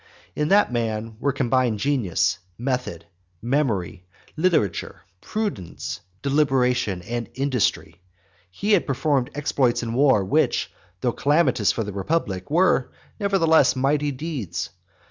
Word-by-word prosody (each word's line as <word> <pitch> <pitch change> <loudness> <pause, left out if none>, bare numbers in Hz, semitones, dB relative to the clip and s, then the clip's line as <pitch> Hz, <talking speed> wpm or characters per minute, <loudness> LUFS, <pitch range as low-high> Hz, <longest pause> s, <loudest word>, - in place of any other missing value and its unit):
In 150 - 0
that 200 -7 +4
man 115 -1 -2
were 140 - +1
combined 130 -3 +1
genius, 115 - 0 0.2
method, 125 -9 -3 0.3
memory, 110 - -1 0.3
literature, 160 - 0 0.2
prudence, 205 - -4 0.2
deliberation, 125 -9 +1
and 120 +3 -4
industry. 130 -8 -1 0.5
He 200 - -2
had 200 -5 +3
performed 135 -1 +1
exploits 135 -4 +1
in 115 -1 -3
war 130 -6 +4
which, - - +1 0.3
though 125 - +1
calamitous 140 - +2
for 115 - -2
the 105 -1 -6
republic, 95 - -2
were 170 -4 +2 0.3
nevertheless 165 - +3
mighty 145 +3 +1
deeds. 130 - -4
130 Hz, 115 wpm, -23 LUFS, 110-150 Hz, 0.5 s, that